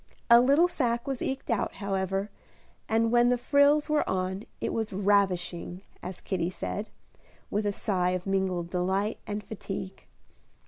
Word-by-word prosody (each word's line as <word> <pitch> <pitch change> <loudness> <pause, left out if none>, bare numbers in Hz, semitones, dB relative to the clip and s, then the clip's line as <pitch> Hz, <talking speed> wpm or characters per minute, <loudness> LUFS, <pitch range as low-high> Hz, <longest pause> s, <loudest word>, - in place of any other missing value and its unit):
A 235 0 +10
little 285 +7 +5
sacque 235 -8 -1
was 270 -2 -3
eked 265 -2 -3
out, 225 - -1
however, 195 0 -2 0.6
and 225 0 +2
when 240 0 +5
the 250 - +3
frills 285 +4 +4
were 300 -1 +1
on, 190 +2 -2
it - - -2
was 220 -1 -2
"ravishing," 190 -2 0 0.2
as 185 0 -7
Kitty 175 -3 -1
said, 205 +3 -4 0.6
with 210 +1 0
a - - +2
sigh 185 -3 0
of 180 0 -2
mingled 190 -3 -1
delight 190 +4 0
and 210 0 -3
fatigue. 195 -2 -7
200 Hz, 150 wpm, -28 LUFS, 190-235 Hz, 0.6 s, A